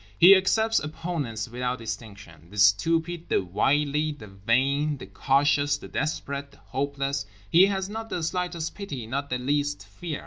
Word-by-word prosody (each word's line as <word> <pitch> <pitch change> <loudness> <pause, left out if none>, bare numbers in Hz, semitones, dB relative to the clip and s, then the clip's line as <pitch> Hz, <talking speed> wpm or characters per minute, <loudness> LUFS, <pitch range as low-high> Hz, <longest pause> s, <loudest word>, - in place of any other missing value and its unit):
He 185 +3 +9
accepts 220 +4 +2
opponents 150 -8 -4
without 125 +1 -2
distinction—the 105 -6 -9
stupid, 165 +12 +2
the - - +2
wily, 145 - +1
the 125 -7 -11
vain, 130 +9 +1
the - - -9
cautious, 145 +1 +2
the - - -10
desperate, 140 -2 -3
the - - -21
hopeless. 140 -2 -3 0.2
He 180 +4 +7
has 190 -1 -1
not 225 +2 -6
the 175 - -3
slightest 175 -1 -2
pity, 145 - -6
not 140 +5 -3
the 125 - 0
least 145 -2 -1
fear. 150 +10 -6
140 Hz, 150 wpm, -26 LUFS, 120-165 Hz, 0.2 s, He